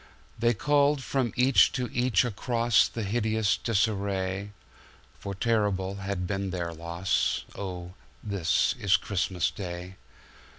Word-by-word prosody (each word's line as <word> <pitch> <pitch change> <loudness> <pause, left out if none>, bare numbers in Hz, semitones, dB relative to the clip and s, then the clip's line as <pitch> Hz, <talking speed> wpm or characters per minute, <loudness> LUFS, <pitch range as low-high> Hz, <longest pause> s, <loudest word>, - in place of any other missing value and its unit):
They 120 +1 +2
called 145 +3 +2
from 130 -4 0
each 130 +1 +5
to 125 -2 -1
each 120 -4 +3
acrossThe 115 -1 +1
hideous 110 -1 +1
disarray, 100 -3 -1 0.7
For 100 -1 -5
terrible 100 -3 0
has 100 0 -3
been 95 +2 -2
their 85 -2 -3
loss:"Oh, 90 +1 -2 0.3
this 100 -6 +1
is 100 0 +4
Christmas 95 -3 -1
Day!" 90 0 -7
100 Hz, 110 wpm, -28 LUFS, 95-115 Hz, 0.7 s, each